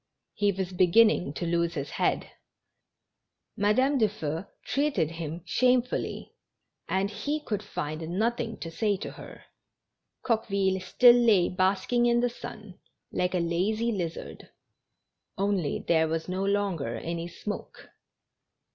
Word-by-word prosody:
He 205 -1 +2
was 190 -1 -3
beginning 185 -2 +4
to 170 - -4
lose 170 0 0
his 140 -2 -4
head. - - 0 1.2
Madame 255 +7 +2
Dufeu 190 -6 -1 0.2
treated 275 - 0
him 165 0 -6
shamefull}', 250 +4 +1 0.6
and 195 +2 0
he 285 +9 -2
could 210 -8 -3
find 155 -6 -5
nothing 225 +4 -1
to 165 - -5
say 205 +3 0
to - - -6
her. - - -12 0.8
Coqueville 200 -5 +1
still 240 +6 +6
lay 220 -7 +4
basking 190 +6 +1
in 240 0 +3
the 245 0 +2
sun, 215 -5 -10 0.3
like 180 +1 0
a - - +2
lazy 195 +8 0
lizard, 175 -6 -5 0.9
only 195 -6 -1
there 160 -1 +3
was 160 0 -2
no 185 +1 -2
longer 195 - 0
any 170 +7 -4
smoke. 205 +4 -7
195 Hz, 125 wpm, -28 LUFS, 170-225 Hz, 1.2 s, still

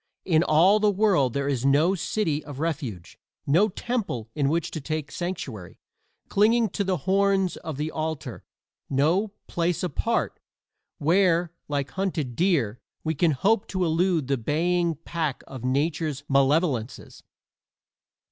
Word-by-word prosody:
In 160 -4 +3
all 175 +6 +5
the 210 0 +3
world 190 - +2
there 140 0 -1
is 135 -4 -1
no 145 +7 +4
city 165 -5 -1
of 145 -3 -9
refuge 140 - -4 0.3
no 175 +10 +4
temple 190 - -3
in 140 -2 +1
which 165 +1 -1
to 155 - -5
take 155 -1 -4
sanctuary, 135 - -5 0.5
clinging 220 +2 +3
to 200 - -1
the 190 -1 0
horns 195 -1 +2
of 155 -4 -6
the 150 +2 -2
altar 155 -6 -4 0.5
no 160 +10 +2 0.2
"place 175 0 -1
apart" 175 -6 -1 0.6
where, 170 +1 +2 0.2
like 140 -2 -2
hunted 170 -10 -2
deer, 140 - +1 0.2
we 160 - 0
can 165 +3 +2
hope 200 - +1
to 185 -2 -1
elude 165 -1 +1
the 135 -1 +1
baying 170 +6 +1
pack 160 -5 -2
of 130 -3 -9
Nature's 145 +2 -1
malevolences. 135 -3 0
160 Hz, 140 wpm, -25 LUFS, 140-185 Hz, 0.6 s, all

